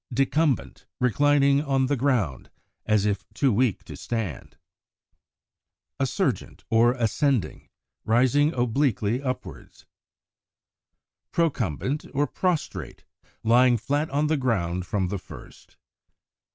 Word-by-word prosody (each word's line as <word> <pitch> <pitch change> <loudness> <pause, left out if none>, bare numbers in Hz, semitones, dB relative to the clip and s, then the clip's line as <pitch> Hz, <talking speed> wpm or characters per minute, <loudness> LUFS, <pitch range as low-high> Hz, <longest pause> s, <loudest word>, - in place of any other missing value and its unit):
Decumbent, 135 +2 0
reclining 140 +2 +3
on 135 -3 +1
the 145 +2 0
ground, 120 - -1 0.4
as 105 -2 +2
if 100 -1 -1
too 135 -5 +2
weak 115 -1 +1
to - - -10
stand. 110 - -5 1.4
Assurgent 135 - -2
or 115 +2 +4
Ascending, 120 - -1 0.4
rising 130 +6 +3
obliquely 120 -2 0
upwards. 130 -2 -6 1.5
Procumbent 140 - -1
or 145 +2 +2
Prostrate, 175 +3 -3 0.4
lying 120 +2 +5
flat 145 +7 -1
on 145 +2 0
the 155 0 +1
ground 90 -9 -1
from 95 -2 -1
the 100 0 -3
first. - - -14
125 Hz, 100 wpm, -25 LUFS, 110-145 Hz, 1.5 s, lying